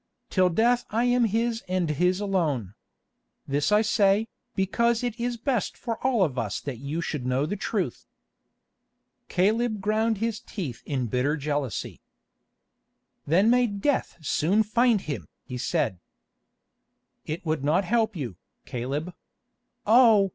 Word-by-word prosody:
"Till 185 -1 +4
death 240 +7 +2
I 225 +3 +1
am 245 -1 +3
his 230 +2 0
and 185 -2 0
his 180 +5 +1
alone. 160 - -1 0.7
This 145 +5 0
I 210 +1 +5
say, 210 0 +3 0.3
because 235 +5 +1
it 240 -1 -3
is 240 0 -1
best 245 -2 -1
for 230 -2 -4
all 250 -6 +3
of 135 -7 -1
us 105 -3 -2
that 135 -5 -6
you 145 +5 -3
should 150 -5 -3
know 130 +3 +1
the 200 - -2
truth." 195 - -3 1.2
Caleb 215 +4 +1
ground 215 +2 +1
his 225 0 -2
teeth 140 - -6
in 130 -4 -1
bitter 125 +6 0
jealousy. 145 -5 -3 1.3
"Then 190 +9 +4
may 245 0 +4
death 205 +7 -1
soon 195 +11 +2
find 230 0 +3
him!" 145 -6 -5 0.2
he 125 -2 -6
said. 110 -6 0 1.3
"It 155 +3 -4
would 155 -3 -1
not 165 +7 +2
help 225 +1 +1
you, 120 - -5 0.3
Caleb. 140 +8 -4 0.7
Oh! 220 -3 +6
190 Hz, 140 wpm, -26 LUFS, 145-225 Hz, 1.3 s, Oh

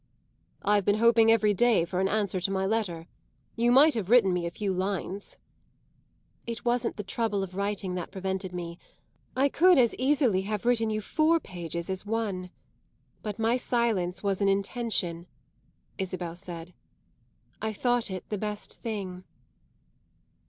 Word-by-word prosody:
"I've 205 0 +3
been 205 +2 +3
hoping 230 0 +5
every 215 -2 +4
day 220 -4 +3
for 180 +1 -3
an 190 - +2
answer 200 -2 0
to 185 - 0
my 190 0 0
letter. 190 -6 -1 0.5
You 240 +1 +2
might 290 +5 +7
have 210 -5 -3
written 225 -6 +5
me 175 -1 -1
a - - -1
few 195 +2 -2
lines." 195 +1 -3 1.1
"It 230 0 -5
wasn't 240 -1 0
the 210 - -3
trouble 205 0 -1
of 185 -1 -7
writing 200 -2 -2
that 180 -2 -4
prevented 190 -1 -3
me; 170 -1 -6 0.6
I 275 +2 +4
could 355 +5 +5
as 240 -3 +4
easily 260 -7 +2
have 210 +2 -3
written 230 -2 +2
you 215 0 -1
four 315 +9 +2
pages 170 - -6
as 190 -1 -3
one. 205 -4 -2 0.7
But 210 -2 -5
my 225 +2 +2
silence 225 -8 0
was 200 -1 0
an 200 - +4
intention," 195 -4 -1 0.7
Isabel 180 -3 -4
said. 175 -1 -9 0.9
"I 220 +1 -1
thought 245 +2 0
it 185 -1 -6
the 210 - -2
best 210 0 -5
thing." 195 -5 -5
205 Hz, 155 wpm, -28 LUFS, 185-230 Hz, 1.1 s, might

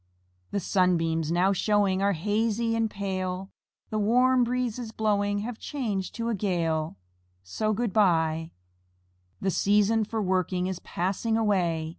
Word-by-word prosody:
The 200 - -1
sunbeams 165 -4 +1
now 180 +3 +3
showing 200 -1 +1
Are 200 0 +2
hazy 220 +5 0
and 225 -1 +1
pale, 190 -1 -4 0.4
The 215 - 0
warm 250 +4 +4
breezes 245 -1 -2
blowing 205 -2 0
Have 225 +1 -5
changed 215 -10 -3
to 230 -1 -3
a - - 0
gale, 165 - -1 0.5
So, 215 - -1
"Good 220 -1 -1
by." 165 -5 +2 0.9
The 190 - +1
season 210 +4 +3
for 220 +1 -3
working 185 -2 0
Is 185 -1 -3
passing 200 +5 -1
away. 175 -7 +1
200 Hz, 135 wpm, -27 LUFS, 180-220 Hz, 0.9 s, warm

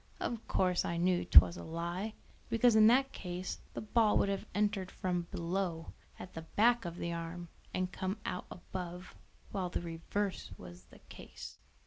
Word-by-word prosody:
Of 235 -1 -3
course 180 -1 +2
I 170 - -2
knew 175 +1 +2
'twas 85 +2 +8
a 85 - -7
lie, 170 - -4 0.3
because 230 0 +4
in 215 0 +8
that 270 +4 +4
case 180 0 -5 0.2
the - - -3
ball 215 0 +3
would 200 - +2
have 200 +2 -2
entered 205 -3 +1
from 175 -2 -2
below, 170 -1 -2 0.2
at 185 - -9
the 165 - -5
back 230 +7 +3
of 170 -1 -4
the 170 -1 -3
arm, 170 +1 -5 0.2
and 185 0 -1
come 190 +3 -3
out 180 - -3
above, 180 0 -7 0.4
while 185 -3 -2
the - - -2
reverse 175 +4 -3
was 90 0 -11
the - - -18
case." - - -10
180 Hz, 170 wpm, -33 LUFS, 170-205 Hz, 0.4 s, twas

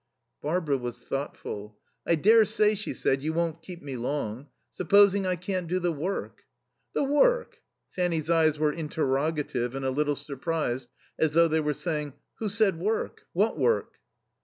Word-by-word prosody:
Barbara 150 -3 0
was 120 -1 -5
thoughtful. 105 -6 -5 0.3
"I 170 - +4
daresay," 215 +3 +5
she 215 +1 -3
said, 135 0 0
"you 155 +2 -2
won't 165 -1 -1
keep 175 -1 -10
me 140 -2 -5
long. 125 0 -3 0.2
Supposing 200 +2 +4
I 185 - +1
can't 180 0 -3
do 180 +3 0
the 175 -1 0
work?" 170 +6 -4 0.5
"The - - +2
work?" 475 - +2 0.3
Fanny's 170 -4 -1
eyes 160 -2 +3
were 150 0 +1
interrogative 145 -4 -1
and 135 0 -3
a 130 - +1
little 145 +2 +1
surprised, 140 -3 -3 0.3
as 160 -2 +2
though 170 +1 +6
they 160 0 +1
were 150 -1 0
saying, 150 -4 -3 0.3
"Who 220 - -1
said 205 -5 +2
work? 215 +5 -2
What - - +1
work?" 470 - +1
160 Hz, 160 wpm, -27 LUFS, 140-185 Hz, 0.5 s, though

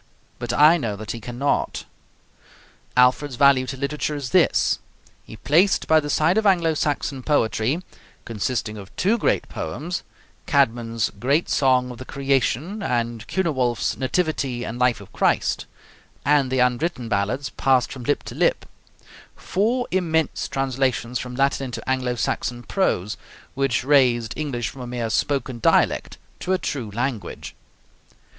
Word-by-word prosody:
But 120 -1 -3
I 155 +4 +6
know 115 -9 -3
that 110 +1 -6
he 115 - -6
cannot." 125 +5 -1 1.1
Alfred's 125 +2 +3
value 135 -1 +4
to 135 - -5
literature 150 +2 -2
is 135 -4 -5
this: - - +3 0.5
he - - -10
placed 175 - +3
by 160 0 +6
the 145 -1 -4
side 160 +7 +3
of 220 - -3
Anglo 170 -4 +3
Saxon 145 -2 -2
poetry, 130 +3 +1 0.4
consisting 110 -1 -3
of 95 -1 -10
two 220 +5 +2
great - - +1
poems, 145 - -4 0.5
Caedmon's 115 -5 +1
great 140 +8 +1
song 130 -2 +2
of 120 - -10
the 130 - -7
'Creation' 140 - -1
and 120 - -2
Cynewulf's 130 -11 0
'Nativity 135 -4 -1
and 120 +1 -6
Life 125 -4 +2
of 100 - -14
Christ,' - - +1 0.6
and 145 -2 +3
the 130 - +1
unwritten 125 +1 0
ballads 115 +6 -1
passed 130 -2 +2
from 130 - -8
lip 145 - 0
to - - -8
lip, - - +1 0.7
four 235 +6 0
immense 160 -4 0
translations 130 -2 -1
from 125 0 -6
Latin 140 +1 +1
into 125 - -7
Anglo 130 -2 0
Saxon 120 +1 -2
prose, 105 - -1 0.4
which 135 -3 0
raised 125 -5 +3
English 125 -7 -3
from 135 - -10
a 125 - -6
mere 120 -2 -3
spoken 135 -3 -1
dialect - - +2 0.2
to 185 - -1
a - - +3
true 135 -9 -4
language. 120 +1 -4
130 Hz, 145 wpm, -23 LUFS, 120-150 Hz, 1.1 s, I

